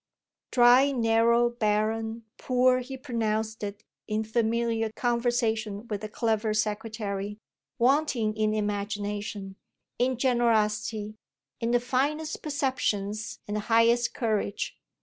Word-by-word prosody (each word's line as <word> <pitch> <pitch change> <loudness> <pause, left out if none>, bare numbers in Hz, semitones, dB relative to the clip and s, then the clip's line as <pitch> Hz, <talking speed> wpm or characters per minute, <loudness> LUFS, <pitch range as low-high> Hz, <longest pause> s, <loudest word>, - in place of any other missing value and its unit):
Dry, 250 +3 +6
narrow, 235 -1 +3
barren, 220 0 -1
poor 255 0 +3
he 260 +1 -6
pronounced 220 -4 -2
it 205 +1 -5 0.2
in 215 0 -1
familiar 225 0 0
conversation 235 -3 0
with 210 -2 -3
the 215 - -5
clever 220 -1 0
secretary; 210 -1 -2 0.4
wanting 250 -4 +2
in 215 0 +1
imagination, 205 -1 -3 0.4
in 255 0 +1
generosity, 220 -3 +1 0.4
in 230 - -1
the 245 0 +3
finest 280 +6 -1
perceptions 225 -8 -2
and 205 - -3
the - - -1
highest 230 +1 +4
courage. 215 -3 -1
225 Hz, 110 wpm, -27 LUFS, 215-240 Hz, 0.4 s, Dry